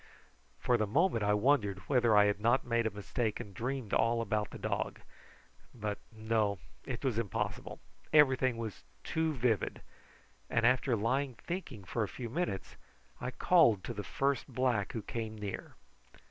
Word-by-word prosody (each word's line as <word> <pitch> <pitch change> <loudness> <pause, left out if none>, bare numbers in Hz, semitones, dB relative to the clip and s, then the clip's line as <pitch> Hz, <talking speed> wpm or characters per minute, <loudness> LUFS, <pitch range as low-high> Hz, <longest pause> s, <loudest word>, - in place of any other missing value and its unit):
For 125 - +2
the 110 - 0
moment 140 - +2
I 105 0 +3
wondered 105 -4 +2
whether 120 -6 +4
I 105 - +7
had 105 0 +1
not 120 +4 +3
made 115 -1 +1
a - - +1
mistake 105 +2 -2
and 100 - -8
dreamed 125 +1 -3
all 115 +1 +3
about 105 -2 -1
the - - -8
dog; - - -2 0.8
but 105 -3 -3
no, 110 -2 0 0.3
it 130 +1 -4
was 120 -4 +1
impossible, 105 -3 -3 0.3
everything 130 -5 +5
was 110 -4 -5 0.2
too 160 0 0
vivid, 120 -7 0 0.7
and 115 - +2
after 125 0 +3
lying 125 +4 0
thinking 140 - -6
for 115 +5 -3
a 105 - +1
few 120 +2 -7
minutes 160 - -3 0.4
I 125 - -3
called 130 - +4
to 120 - -4
the 105 - -4
first 140 +4 0
black 125 -6 0
who 110 - -4
came 110 -1 -4
near. 105 -2 -6
115 Hz, 160 wpm, -32 LUFS, 105-130 Hz, 0.8 s, I